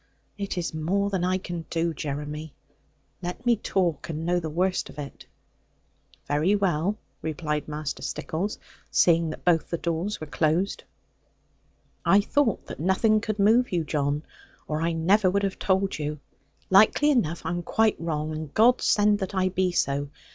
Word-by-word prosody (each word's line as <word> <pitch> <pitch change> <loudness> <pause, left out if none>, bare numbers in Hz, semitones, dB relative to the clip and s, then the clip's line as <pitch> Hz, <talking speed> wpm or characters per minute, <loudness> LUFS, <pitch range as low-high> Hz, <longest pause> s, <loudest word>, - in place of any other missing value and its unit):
It 200 -2 -4
is 170 -2 -2
more 195 +6 0
than 190 -3 0
I 185 +1 +2
can 175 -3 -6
do, 165 0 0
Jeremy. 150 +1 -5 0.7
Let 180 +7 -6
me 240 -1 +5
talk, 175 -7 -1
and 160 0 -4
know 175 +1 +2
the 160 -2 -4
worst 180 +4 0
of - - -13
it.' 140 -2 -8 1.0
'Very 150 +8 +2
well,' 195 0 0 0.2
replied 150 -1 -3
Master 150 -1 -4
Stickles, 190 +7 -3 0.3
seeing 165 -1 +3
that 155 - -8
both 170 -3 +3
the 170 - -1
doors 170 +5 -2
were 155 - -5
closed; 155 +6 0 1.2
'I 200 +1 +5
thought 245 +1 +1
that - - -8
nothing 210 +6 +3
could 215 -1 -3
move 225 +5 +4
you, 175 -3 +1
John; 145 -1 -1 0.4
or 155 0 -2
I 165 +1 +1
never 185 +5 +3
would 200 +2 0
have 195 -1 -2
told 190 -2 +1
you. 150 0 -3 0.5
Likely 215 +9 +6
enough 170 - 0
I 165 - -1
am 175 0 -2
quite 220 +5 +2
wrong; 155 -2 -2
and 155 -2 -5
God 240 +3 +5
send 205 0 +3
that 190 +1 -4
I 185 0 +2
be 185 0 0
so. 140 -4 0
175 Hz, 170 wpm, -26 LUFS, 155-200 Hz, 1.2 s, Likely